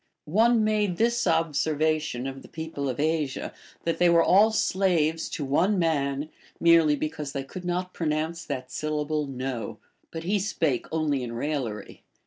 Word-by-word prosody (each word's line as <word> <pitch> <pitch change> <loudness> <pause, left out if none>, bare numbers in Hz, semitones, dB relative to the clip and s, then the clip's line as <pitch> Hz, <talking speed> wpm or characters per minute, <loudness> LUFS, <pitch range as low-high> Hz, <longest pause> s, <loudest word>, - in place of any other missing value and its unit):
One 225 +7 +3
made 210 -4 +1
this 235 -1 +2
observation 155 -4 +1
of 135 0 -5
the - - -13
people 160 -4 -4
of 125 - -4
Asia, 155 -3 -1 0.3
that 165 - -1
they 175 - +5
were 170 -1 +5
all 205 +4 +6
slaves 175 -6 +1
to 145 - -4
one 175 +9 +2
man, 145 -3 0 0.3
merely 165 -3 +5
because 150 -1 -4
they 140 -2 -3
could 180 +6 -9
not 180 +1 -2
pronounce 160 +1 -2
that 130 0 -5
syllable 150 +1 -2
No; 130 -4 -4 0.3
but 165 0 -6
he 200 +4 +1
spake 160 - -1
only 155 -4 0
in 120 -2 -5
raillery. 120 -5 -4
155 Hz, 155 wpm, -26 LUFS, 140-175 Hz, 0.3 s, all